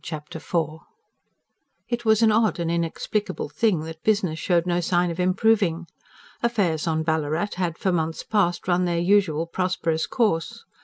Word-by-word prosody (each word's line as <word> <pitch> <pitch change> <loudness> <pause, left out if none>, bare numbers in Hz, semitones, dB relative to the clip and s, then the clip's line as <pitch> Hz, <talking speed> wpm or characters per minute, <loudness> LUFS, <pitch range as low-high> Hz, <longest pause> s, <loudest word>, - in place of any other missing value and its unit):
Chapter 155 -1 -7
IV 160 -2 -2 1.1
It 240 -1 -3
was 220 0 +4
an 220 - +5
odd 215 -4 +2
and 170 -1 -1
inexplicable 170 +5 -2
thing 210 -9 +1
that 160 0 -8
business 195 -7 +1
showed 175 -2 +1
no 175 -1 +1
sign 175 0 +1
of 170 - -7
improving. 185 -2 +2 0.6
Affairs 195 -10 0
on 160 -1 0
Ballarat 160 +4 -1
had, 175 -3 -1
for 190 - 0
months 165 -2 -1
past, 180 -6 0
run 180 0 +2
their 170 -1 0
usual 175 -3 +2
prosperous 170 -2 -1
course. 205 - -1
175 Hz, 155 wpm, -24 LUFS, 160-205 Hz, 1.1 s, an